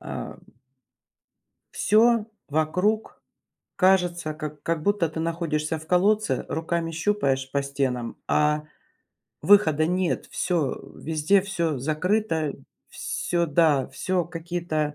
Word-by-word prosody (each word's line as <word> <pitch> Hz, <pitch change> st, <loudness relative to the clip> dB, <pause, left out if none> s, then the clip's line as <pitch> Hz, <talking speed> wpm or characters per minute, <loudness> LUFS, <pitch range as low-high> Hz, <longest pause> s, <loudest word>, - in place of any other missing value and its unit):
Ам. -, -, -7 dB, 1.4 s
Всё 225 Hz, +1 st, +4 dB, 0.2 s
вокруг 180 Hz, +9 st, 0 dB, 0.6 s
кажется, 180 Hz, -4 st, +2 dB
как 150 Hz, -1 st, -7 dB
как 165 Hz, -2 st, -1 dB
будто 205 Hz, -2 st, +1 dB
ты 160 Hz, +1 st, -5 dB
находишься 160 Hz, -1 st, -1 dB
в 155 Hz, -, -13 dB
колодце, 205 Hz, +5 st, +2 dB
руками 165 Hz, 0 st, -2 dB
щупаешь 150 Hz, -7 st, 0 dB
по 140 Hz, +1 st, 0 dB
стенам, 135 Hz, -4 st, -2 dB
а 150 Hz, 0 st, +2 dB, 0.8 s
выхода 155 Hz, -7 st, +5 dB
нет. 180 Hz, +1 st, 0 dB
Всё, 170 Hz, -7 st, -1 dB
везде 160 Hz, +5 st, +2 dB
всё 170 Hz, -7 st, -1 dB
закрыто, 160 Hz, -, 0 dB, 0.4 s
всё, 170 Hz, -1 st, -2 dB
да, 150 Hz, -3 st, +3 dB
всё 185 Hz, -2 st, -1 dB
какие-то, 165 Hz, -3 st, -3 dB
165 Hz, 105 wpm, -25 LUFS, 150-180 Hz, 1.4 s, выхода